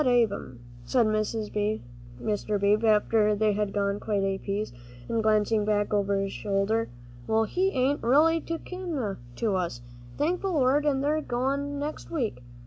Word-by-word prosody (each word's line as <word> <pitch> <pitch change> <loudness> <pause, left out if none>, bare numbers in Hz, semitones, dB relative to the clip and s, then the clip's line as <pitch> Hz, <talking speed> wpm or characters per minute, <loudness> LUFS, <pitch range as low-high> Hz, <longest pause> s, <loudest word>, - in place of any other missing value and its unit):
"That - - 0
Ab'm," 225 - +1 0.3
said 235 - +2
Mr. 210 - -2
Beebe, 210 +3 +3
after 210 0 +3
they 210 0 +2
had 205 0 -1
gone 200 0 0
quite 205 -2 -1
a 195 0 0
piece, 200 - -3 0.3
and 230 - 0
glancing 215 0 +2
back 205 0 0
over 200 -1 +2
his 195 0 -2
shoulder, 205 +3 0 0.4
"well, 220 0 +3
he 370 - +1
ain't 270 -3 +1
reelly 310 +6 +4
no 330 - -1
kin 325 - -4 0.2
to 215 -4 0
us, 170 -10 -2 0.4
thank 340 +5 0
the 390 - -1
Lord, 290 -3 +2
an' 270 -2 +2
they're 295 +2 +1
a - - -1
goin' 280 +3 -1
next 295 +2 -5
week. 235 - -2
215 Hz, 165 wpm, -27 LUFS, 205-275 Hz, 0.4 s, reelly